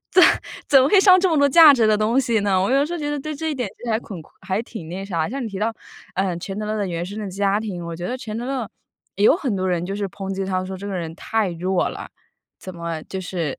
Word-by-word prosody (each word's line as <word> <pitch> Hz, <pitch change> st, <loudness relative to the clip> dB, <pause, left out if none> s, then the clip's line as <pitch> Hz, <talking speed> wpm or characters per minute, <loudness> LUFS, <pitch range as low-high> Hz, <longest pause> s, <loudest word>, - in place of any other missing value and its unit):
怎 370 Hz, -, +6 dB, 0.5 s
怎 270 Hz, -2 st, +7 dB
么 265 Hz, -, +3 dB
会 390 Hz, +4 st, +6 dB
上 375 Hz, -2 st, +7 dB
这 375 Hz, -, +3 dB
么 320 Hz, -, +1 dB
多 285 Hz, 0 st, +5 dB
价 300 Hz, 0 st, +8 dB
值 235 Hz, -3 st, +2 dB
的 215 Hz, -1 st, +3 dB
东 220 Hz, +5 st, +2 dB
西 235 Hz, -4 st, +1 dB
呢？ 195 Hz, -2 st, +2 dB
我 195 Hz, -, 0 dB
有 265 Hz, -, +4 dB
的 290 Hz, -, +1 dB
时 345 Hz, -, -6 dB
候 -, -, -4 dB
觉 295 Hz, -1 st, -3 dB
得 295 Hz, -, -2 dB
对 305 Hz, +2 st, -5 dB
这 320 Hz, +2 st, -3 dB
一 -, -, -2 dB
点 250 Hz, -, -2 dB
其 -, -, -13 dB
实 235 Hz, -, -2 dB
还 220 Hz, -, +2 dB
恐 190 Hz, -8 st, -9 dB, 0.2 s
还 190 Hz, +3 st, -1 dB
挺 220 Hz, -9 st, -9 dB
那 185 Hz, +3 st, -5 dB
啥。 170 Hz, -4 st, -2 dB
像 270 Hz, +2 st, -4 dB
你 -, -, -3 dB
提 195 Hz, -2 st, -6 dB
到， 225 Hz, +2 st, 0 dB, 0.4 s
呃， 185 Hz, -2 st, 0 dB
钱 195 Hz, +3 st, -6 dB
德 215 Hz, -, -3 dB
勒 210 Hz, -2 st, -1 dB
原 170 Hz, -1 st, -3 dB
生 205 Hz, +4 st, -7 dB
的 205 Hz, -2 st, -4 dB
家 200 Hz, +1 st, +1 dB
庭， 185 Hz, -6 st, -5 dB
我 170 Hz, -1 st, -6 dB
觉 175 Hz, +1 st, -5 dB
得 250 Hz, -, -3 dB
钱 220 Hz, -2 st, -6 dB
德 240 Hz, -, -4 dB
勒 260 Hz, -5 st, -3 dB, 0.5 s
也 200 Hz, -, +1 dB
有 305 Hz, -, +6 dB
很 255 Hz, -, -2 dB
多 185 Hz, 0 st, -1 dB
人 175 Hz, -1 st, 0 dB
就 195 Hz, +1 st, -4 dB
是 200 Hz, -1 st, -2 dB
抨 195 Hz, 0 st, -6 dB
击 195 Hz, -, -2 dB
他 185 Hz, -1 st, -1 dB
说， 190 Hz, 0 st, -6 dB
这 200 Hz, +2 st, -8 dB
个 200 Hz, -, -4 dB
人 165 Hz, -3 st, -4 dB
太 215 Hz, -1 st, -1 dB
弱 180 Hz, +2 st, 0 dB
了， -, -, -7 dB, 0.5 s
怎 185 Hz, -1 st, -8 dB
么 170 Hz, -2 st, -5 dB
就 190 Hz, -, -5 dB
是 170 Hz, -5 st, -4 dB
200 Hz, 325 characters per minute, -22 LUFS, 185-250 Hz, 0.5 s, 价